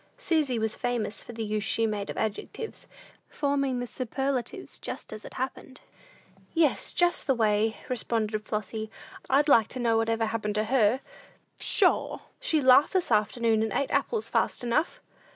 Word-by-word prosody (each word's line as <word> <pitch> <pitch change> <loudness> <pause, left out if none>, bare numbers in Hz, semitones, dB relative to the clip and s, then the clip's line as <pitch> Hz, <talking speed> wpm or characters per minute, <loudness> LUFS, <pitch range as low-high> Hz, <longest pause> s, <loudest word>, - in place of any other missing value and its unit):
Susy 315 - +1
was 220 -1 -1
famous 240 -3 -2
for 240 - -9
the 225 0 -4
use 210 -1 -1
she 225 - +1
made 210 -2 -2
of - - -5
adjectives, 220 - -4 0.4
forming 275 -3 0
the 245 - -2
superlatives 270 - -3
just - - -7
as 215 - -8
it - - -10
happened. 260 0 -5 0.8
"Yes, 325 -4 +2
just 350 -5 +2
the 270 - +3
way," 220 -1 +2
responded 220 -3 -1
Flossy. 215 +1 -4 0.4
"I'd 285 +3 +4
like 230 -7 +6
to 255 - -5
know 230 -2 +2
what 225 0 +1
ever 225 0 +1
happened 215 -1 -2
to 215 - +2
her? 240 +1 +3 0.6
Pshaw! - - +2 0.2
She 310 -2 +1
laughed 260 +2 +6
this 370 -2 0
afternoon, 220 +1 +2
and 220 -1 0
ate 280 +6 -1
apples 450 -2 0
fast - - 0
enough!" 245 +7 0
235 Hz, 165 wpm, -28 LUFS, 220-270 Hz, 0.8 s, like